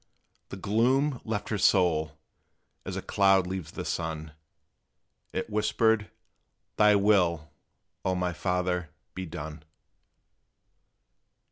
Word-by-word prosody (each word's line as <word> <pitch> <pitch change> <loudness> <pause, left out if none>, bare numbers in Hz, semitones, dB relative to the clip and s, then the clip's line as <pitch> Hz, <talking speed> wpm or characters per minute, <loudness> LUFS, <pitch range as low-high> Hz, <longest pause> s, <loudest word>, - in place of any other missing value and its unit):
The 95 - -7
gloom 125 +7 +1
left 105 -2 -3
her 105 - -1
soul, 80 -6 +3 0.7
as - - -4
a - - -4
cloud 95 -2 +3
leaves 95 -2 -5
the - - -5
sun; 80 -1 -3 1.0
It - - -3
whispered, 110 0 +1 0.7
"Thy 105 -1 +5
will, 90 -8 +2 0.5
O 95 - 0
my 90 -1 -1
Father, 90 0 -1 0.2
be 95 -1 -5
done!" 80 -1 -7
95 Hz, 105 wpm, -28 LUFS, 85-105 Hz, 1.0 s, Thy